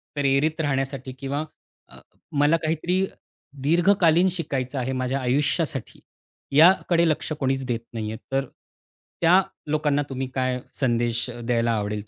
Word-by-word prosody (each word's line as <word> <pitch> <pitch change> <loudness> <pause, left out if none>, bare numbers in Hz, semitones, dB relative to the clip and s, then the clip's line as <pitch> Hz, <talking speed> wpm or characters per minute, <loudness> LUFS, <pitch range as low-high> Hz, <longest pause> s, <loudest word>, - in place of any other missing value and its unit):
प्रेरित 145 +3 +1
राहण्यासाठी 135 -2 -2
किंवा 140 +2 -2 0.5
अ, - - -15 0.3
मला 145 +2 +3
काहीतरी 175 +4 0 0.6
दीर्घकालीन 175 +2 +4
शिकायचं 140 -6 -2
आहे 130 +1 -2
माझ्या 130 +1 -1
आयुष्यासाठी, 140 +1 -1 0.6
याकडे 170 +1 +5
लक्ष 155 - -2
कोणीच 135 -1 0
देत 120 -2 -1
नाहीये. 110 -1 -4
तर 135 0 +1 0.8
त्या 180 +3 +6 0.3
लोकांना 150 -2 +1
तुम्ही 130 0 -3
काय 130 -1 0 0.2
संदेश 120 -2 0 0.2
द्यायला 115 -1 +1
आवडेल 105 -1 -2
135 Hz, 120 wpm, -24 LUFS, 125-160 Hz, 0.8 s, त्या